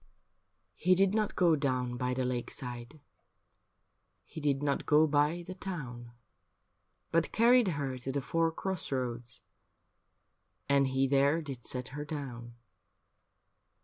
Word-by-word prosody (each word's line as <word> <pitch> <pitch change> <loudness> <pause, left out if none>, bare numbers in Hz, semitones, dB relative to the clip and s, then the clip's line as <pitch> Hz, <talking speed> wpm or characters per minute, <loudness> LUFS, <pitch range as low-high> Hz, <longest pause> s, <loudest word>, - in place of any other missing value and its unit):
He 185 +2 +3
did 195 +1 +3
not 215 -1 0
go 170 -3 +4
down 125 -4 -1
by 125 +1 -1
the 130 0 -1
lakeside. 125 +2 -5 1.3
He 160 - -9
did 145 -1 0
not 140 -1 -1
go 155 +1 +6
by 150 +3 +1
the 185 - -6
town. 125 -11 -7 1.0
But 165 0 +1
carried 240 0 +5
her 140 -6 -2
to 130 +2 -4
the 140 - -1
four 165 +4 0
cross 190 0 -4
roads. 120 -3 -4 1.3
And 140 -1 +3
he 135 +1 +1
there 140 +3 +3
did 135 -7 -7
set 125 -1 -1
her 145 +2 -5
down. 125 -6 -7
140 Hz, 130 wpm, -31 LUFS, 125-165 Hz, 1.3 s, go